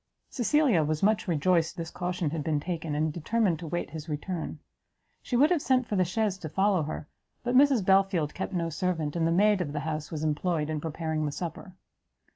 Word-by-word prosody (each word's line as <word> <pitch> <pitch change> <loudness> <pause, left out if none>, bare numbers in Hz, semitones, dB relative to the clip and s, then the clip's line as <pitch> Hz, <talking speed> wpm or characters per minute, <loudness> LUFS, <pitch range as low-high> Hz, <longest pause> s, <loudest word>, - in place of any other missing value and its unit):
Cecilia 255 - +3
was 155 +2 -1
much 215 +1 +2
rejoiced 170 0 +1
this 165 -1 -5
caution 180 -3 -2
had 160 -2 -3
been 150 -1 0
taken, 160 -2 -3
and 155 0 0
determined 175 +1 0
to 165 - -7
wait 175 0 -3
his 160 +1 -7
return. 155 +2 -4 0.6
She 245 - -3
would 295 +6 +5
have 340 -5 +2
sent 255 -2 +2
for 210 - -3
the 185 - +4
chaise 190 +1 -1
to 160 - -6
follow 190 +1 +2
her; 150 0 -5 0.4
but 245 0 -1
Mrs 265 -6 +5
Belfield 190 -5 +3
kept 190 - -4
no 170 -2 -1
servant, 165 -3 -1
and 165 -1 +1
the - - +1
maid 205 +2 +4
of 145 -5 -3
the 150 - -2
house 155 -1 -3
was 155 -1 -4
employed 155 0 0
in 155 -1 -2
preparing 160 -1 -2
the - - -2
supper. 180 +4 -6
170 Hz, 210 wpm, -28 LUFS, 155-195 Hz, 0.6 s, would